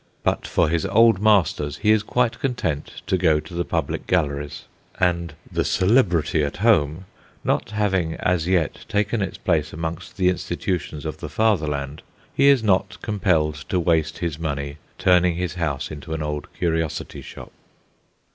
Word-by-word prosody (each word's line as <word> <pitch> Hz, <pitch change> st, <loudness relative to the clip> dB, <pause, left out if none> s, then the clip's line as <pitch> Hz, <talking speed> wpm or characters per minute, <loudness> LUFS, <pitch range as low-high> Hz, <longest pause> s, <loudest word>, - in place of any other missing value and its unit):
But -, -, 0 dB
for 85 Hz, -, +2 dB
his 85 Hz, +1 st, 0 dB
Old 110 Hz, 0 st, +5 dB
Masters 95 Hz, -9 st, +2 dB
he 105 Hz, -, +3 dB
is 110 Hz, -1 st, +4 dB
quite 120 Hz, +2 st, 0 dB
content 120 Hz, -, -3 dB
to 95 Hz, -, 0 dB
go 80 Hz, -4 st, +3 dB
to 80 Hz, +4 st, -11 dB
the 85 Hz, +1 st, -1 dB
public -, -, -2 dB
galleries; 75 Hz, -5 st, -1 dB, 0.4 s
and 85 Hz, -3 st, 0 dB, 0.2 s
"the -, -, 0 dB
Celebrity 90 Hz, -, +2 dB
at 70 Hz, -, -3 dB
Home" 90 Hz, -5 st, +2 dB, 0.4 s
not -, -, 0 dB
having 95 Hz, -6 st, 0 dB
as 90 Hz, -2 st, 0 dB
yet 90 Hz, -5 st, 0 dB
taken 105 Hz, 0 st, 0 dB
its 100 Hz, -, -3 dB
place 80 Hz, -4 st, 0 dB
amongst 80 Hz, +6 st, -5 dB
the 90 Hz, -2 st, +2 dB
institutions 85 Hz, -4 st, -3 dB
of -, -, -4 dB
the -, -, -6 dB
Fatherland, 75 Hz, -9 st, 0 dB, 0.3 s
he 140 Hz, -, +4 dB
is 140 Hz, -5 st, +5 dB
not 95 Hz, -3 st, +1 dB
impelled 80 Hz, -8 st, +1 dB
to 90 Hz, -, +1 dB
waste 80 Hz, -1 st, +1 dB
his, 80 Hz, -3 st, -3 dB
money 70 Hz, -2 st, -3 dB, 0.2 s
turning 90 Hz, -1 st, +4 dB
his 90 Hz, 0 st, -2 dB
house 75 Hz, -6 st, -2 dB
into 80 Hz, +2 st, -6 dB
an 80 Hz, -, -3 dB
old 75 Hz, -1 st, -4 dB
curiosity 80 Hz, -2 st, -2 dB
shop. -, -, -11 dB
85 Hz, 160 wpm, -23 LUFS, 75-95 Hz, 0.4 s, Old